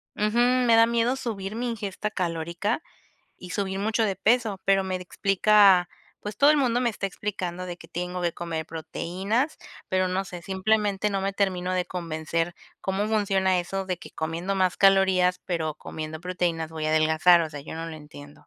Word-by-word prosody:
Ujú, 215 +2 0
me 245 -1 +4
da 225 0 +7
miedo 235 +2 +1
subir 215 -6 -4
mi 245 +2 -2
ingesta 210 -2 -4
calórica 170 - -2 0.5
y 180 - -11
subir 195 0 -2
mucho 220 +2 +1
de 195 -3 -1
peso. 220 0 +2
Pero 195 0 +3
me 185 -1 -2
explica, 195 0 +4 0.3
pues, 210 0 -7
todo 285 +1 +7
el 305 - +4
mundo 245 -3 +2
me 245 - +2
está 205 -3 -3
explicando, 185 -2 -4
de 175 -1 -6
que - - -15
tengo 180 +1 -4
que 170 -1 0
comer 165 -2 -4
proteínas, 190 - -2 0.3
pero 185 0 +2
no 185 +1 -1
sé, 180 -2 -8
simplemente 205 +2 0
no 195 -1 -1
me 195 0 -2
termino 185 -2 0
de 180 -1 0
convencer, 165 -1 -3 0.3
¿cómo 195 +2 -1
funciona 195 -4 +2
eso 195 +2 -4
de 185 -2 -3
que - - -12
comiendo 165 +5 -3
más 185 -2 +1
calorías, 190 -2 +4
pero 160 -4 -2
comiendo 155 +1 -7
proteínas, 175 -3 -2
voy 155 -1 -4
a - - +1
adelgazar? 160 +2 +5
O 160 - -4
sea, 145 -2 -7
yo 140 - -8
no 165 0 -5
lo 165 - -7
entiendo. 145 -1 -13
190 Hz, 190 wpm, -26 LUFS, 175-210 Hz, 0.5 s, da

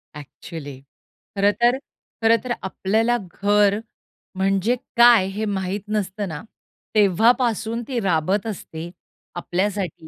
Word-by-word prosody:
Actually. 145 -1 -9 0.6
खरंतर, 210 +5 +3 0.5
खरंतर 230 +2 +3
आपल्याला 220 +5 +1 0.2
घर 205 0 +3 0.6
म्हणजे 195 +4 +1 0.2
काय 235 -5 +7
हे 210 +3 -3
माहित 195 0 -2
नसतं 205 -1 -2
ना, 160 -3 -6 0.5
तेव्हापासून 225 +3 +2
ती 250 -3 -2
राबत 190 +2 0
असते. 170 -5 -6 0.5
आपल्यासाठी 185 -2 -2
200 Hz, 95 wpm, -22 LUFS, 185-225 Hz, 0.6 s, काय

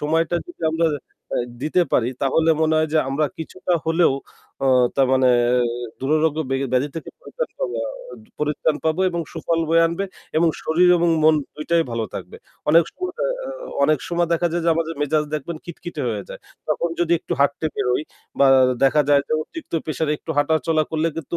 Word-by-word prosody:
সময়টা 165 +3 +1
যদি 350 - -13
আমরা 165 +1 +1 0.5
আ - - +1 0.3
দিতে 155 +4 +2
পারি 120 0 +3
তাহলে 160 +4 +3
মনে 160 0 +2
হয় 155 - +1
যে 160 - +3
আমরা 145 +3 +1
কিছুটা 180 +3 -4
হলেও 165 -2 +3 0.5
অ - - +3 0.3
তা 135 - +4
মানে 130 -1 +4 0.7
দুররোগ্য 155 +2 +1
ব্যা 135 - +1
ব্যাধি 130 +3 +2
থেকে 160 - -6
পরিত্রাণ - - -5
পাব - - -2 0.7
পরিত্রান 150 0 0
পাবো 160 +3 +1
এবং 170 -1 -2
সুফল 165 -1 -1
বয়ে 165 0 +5
আনবে 170 +4 -2 0.3
এবং 165 +1 +4
শরীর 175 +3 +3
এবং 170 0 +2 0.2
মন 155 0 +6 0.2
দুইটাই 165 +2 +1
ভালো 115 -1 -2
থাকবে। - - -7 0.3
অনেক 165 +2 +7
সময় 365 0 -4
অ - - +2 0.2
অ্যা - - -6 0.4
অনেক 155 -1 +3
সময় 175 -1 0
দেখা 170 +1 +2
যায় 170 -1 -1
যে - - +2
আমাদের 165 0 -2
মেজাজ 150 +1 +1
দেখবেন 155 +2 -4
খিটখিটে 170 -3 -7
হয়ে 105 -3 -3
যায়। - - -9 0.3
তখন 170 - 0
যদি 170 0 +2
একটু - - -6
হাঁটতে 140 +3 +2
বেরোই 125 +4 0 0.4
বা 140 - +6 0.4
দেখা 150 +2 +4
যায় 140 -1 +5
যে - - -2
অতিরিক্ত 325 - -11
pressure 155 0 -2
একটু 160 - -9
হাঁটাচলা 155 +2 +2
করলে 160 +1 +1
কিন্তু 165 +1 -4
160 Hz, 185 wpm, -22 LUFS, 150-170 Hz, 0.7 s, অনেক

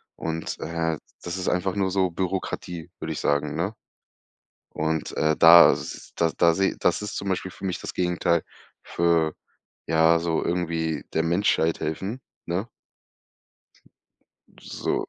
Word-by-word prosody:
Und, 80 0 -4
äh, 80 0 -2 0.3
das 85 +1 -4
ist 90 - -4
einfach 90 +1 0
nur 95 -2 0
so 95 -1 +2
Bürokratie, 90 -2 -4
würde - - -4
ich - - -5
sagen, 75 0 0
ne? 90 +6 -1 1.0
Und, 80 0 -2
äh, 80 0 +2
da 85 +1 +9
s - - -6
da 85 -1 +2
da 85 -1 +5
sehe 95 +1 +1
das 90 - +1
ist 105 - -5
zum 100 - -3
Beispiel 95 0 -2
für - - -11
mich 95 -2 -2
das - - -6
Gegenteil 90 -1 +1 0.4
für, 85 -2 +1 0.5
ja, 80 +1 +4
so 85 -1 -1
irgendwie 85 -2 -1
der 80 - +1
Menschheit 85 -1 +1
helfen, 95 +11 -3 0.2
ne? 90 +6 -2 1.9
So. - - -3
85 Hz, 145 wpm, -25 LUFS, 80-95 Hz, 1.9 s, da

